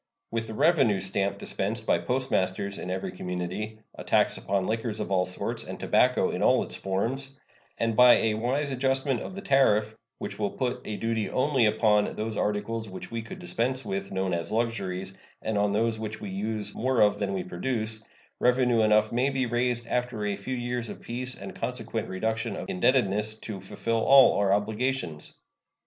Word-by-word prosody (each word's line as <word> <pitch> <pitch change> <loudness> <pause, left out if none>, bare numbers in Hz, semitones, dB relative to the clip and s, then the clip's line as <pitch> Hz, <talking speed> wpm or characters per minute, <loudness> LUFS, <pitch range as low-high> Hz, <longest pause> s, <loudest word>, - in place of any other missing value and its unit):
With 115 -1 -2
the 110 - -6
revenue 140 - +4
stamp 100 +1 -1
dispensed 110 +3 -3
by - - +3
postmasters 100 -6 -1
in - - -5
every 95 +1 -3
community, 90 +5 -4 0.2
a - - -9
tax - - +3
upon 95 -1 -1
liquors 110 0 -2
of 105 - -4
all 90 -1 +2
sorts 90 - -3
and - - -7
tobacco - - +3
in - - -3
all - - +4
its - - -5
forms, 130 +8 -2 0.4
and 115 -1 0
by 125 +1 +8
a 110 -1 +2
wise 130 +6 -1
adjustment 135 -1 0
of 185 - -7
the 195 - -7
tariff, 110 -6 +3 0.2
which - - -6
will 105 -1 +1
put 125 +2 -2
a 105 - -4
duty 115 -2 -1
only 130 -3 +2
upon 105 -1 +2
those 110 +1 -3
articles 105 +2 -1
which 95 - -8
we 115 0 -3
could 185 +12 -9
dispense 130 -7 -1
with, 100 0 -3
known 95 -1 -1
as 85 -1 -2
luxuries, 95 -5 -2 0.3
and 110 - -1
on 100 0 +2
those 110 +2 +1
which 110 -1 -5
we 100 -2 -6
use 105 +1 -3
more 130 0 0
of 105 -1 +4
than 100 -1 -1
we 95 - -2
produce, 110 +3 -3 0.4
revenue 125 -2 +3
enough 105 0 +4
may 125 +4 +2
be 135 -2 0
raised 120 0 0
after 120 -3 -2
a 100 -1 0
few 115 +7 -4
years 120 -1 -3
of - - -7
peace 125 +2 -4
and - - -8
consequent 115 -2 -3
reduction 110 +4 -2
of - - -6
indebtedness 110 - +1
to 110 -3 -7
fulfill 115 +4 -2
all 135 -1 +7
our 100 -1 +2
obligations. 105 - -1
110 Hz, 185 wpm, -27 LUFS, 100-125 Hz, 0.4 s, by